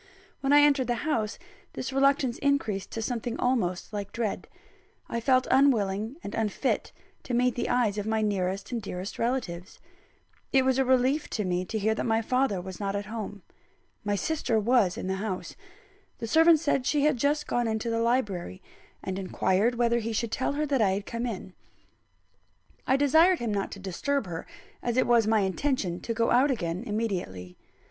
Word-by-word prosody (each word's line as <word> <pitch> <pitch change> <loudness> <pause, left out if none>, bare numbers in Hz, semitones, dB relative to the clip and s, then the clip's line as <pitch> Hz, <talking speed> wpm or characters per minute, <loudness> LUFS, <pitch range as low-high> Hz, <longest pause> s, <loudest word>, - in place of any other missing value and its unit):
When 275 0 0
I 290 0 +8
entered 280 -3 +4
the 240 +3 -2
house, 225 -9 -1 0.4
this 265 - -5
reluctance 270 -2 +2
increased 225 -9 0
to 225 - -4
something 240 +1 -3
almost 215 -7 0
like 200 -1 -4
dread. 230 -3 -3 0.6
I 235 - -2
felt 255 +2 +3
unwilling 225 -4 +2
and 200 - -6
unfit 225 +4 -1 0.3
to 250 - -3
meet 250 0 +3
the 240 - -2
eyes 230 -4 +1
of 205 - -4
my 220 0 +1
nearest 195 -1 -1
and 235 -2 -2
dearest 190 -1 -6
relatives. 225 -7 -3 0.7
It 265 -1 +4
was 260 0 +2
a 265 - +3
relief 260 +4 +2
to 210 - -2
me 180 0 -1
to 220 - -3
hear 220 +1 +1
that 220 - -3
my 225 0 +2
father 250 -4 +1
was 185 0 -8
not 200 -1 -2
at 200 0 -3
home. 210 -3 -6 0.6
My 205 0 0
sister 235 -2 0
was 215 -4 +2
in - - -4
the 190 0 -1
house: 195 -2 -4 0.6
the - - -5
servant 320 +6 +5
said 280 -5 0
she 295 -2 +2
had 300 -3 +3
just 290 +4 +1
gone 240 -1 0
into 220 +1 -1
the 230 0 0
library, 210 -7 -1 0.4
and 190 0 -3
inquired 195 +4 +1
whether 235 0 +2
he 230 0 -3
should 225 +1 -1
tell 260 +4 -1
her 300 +1 -1
that 275 -4 +1
I 195 -3 +3
had 200 +1 -3
come 235 +1 -3
in. 190 -4 -6 1.3
I 265 - +4
desired 320 +6 +5
him 235 -6 -2
not 200 -1 -2
to 200 - -9
disturb 210 +8 -2
her, 170 -3 -6 0.3
as 240 0 -2
it 255 - +4
was 235 -3 +4
my 220 -1 +3
intention 190 -2 -1
to 230 - -3
go 230 0 +1
out 260 +4 +4
again 180 -6 -2
immediately. 180 - -3
230 Hz, 190 wpm, -27 LUFS, 200-260 Hz, 1.3 s, I